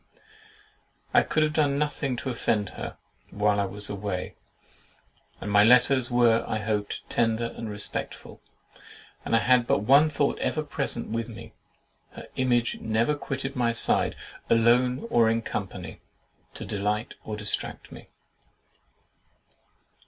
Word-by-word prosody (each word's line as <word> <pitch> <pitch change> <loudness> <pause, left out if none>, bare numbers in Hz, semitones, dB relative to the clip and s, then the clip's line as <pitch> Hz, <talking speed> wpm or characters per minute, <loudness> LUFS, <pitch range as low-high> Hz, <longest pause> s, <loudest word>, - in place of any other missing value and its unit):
I - - +6
could 155 - +1
have 155 0 0
done 145 -3 +2
nothing 145 -3 -1
to 130 +2 -4
offend 105 -4 -1
her - - -7 0.3
while 105 0 +1
I 100 - +1
was 105 +2 -2
away; 100 -2 -4 1.1
and 105 - -5
my 105 0 +6
letters 125 +2 +4
were, 120 -2 +3
I - - -1
hoped, 105 -1 -3
tender 115 0 0
and 115 - -6
respectful. 105 0 -4 0.8
I - - -7
had 115 - +3
had 125 -1 +3
but - - +2
one 140 +7 +5
thought 145 -1 0
ever 155 - -1
present 130 -4 -3
with 115 +1 -3
me; 115 - -11 0.6
her - - -10
image 120 -2 +1
never 110 +5 +1
quitted 135 -1 -5
my 120 -2 +1
side, 115 - +4 0.3
alone 125 - +3
or 115 -1 +4
in 115 0 0
company, 90 -6 -6 0.5
to - - -6
delight 105 +2 -2
or 105 -1 -5
distract 105 -1 -3
me. - - -12
115 Hz, 140 wpm, -26 LUFS, 105-130 Hz, 1.1 s, I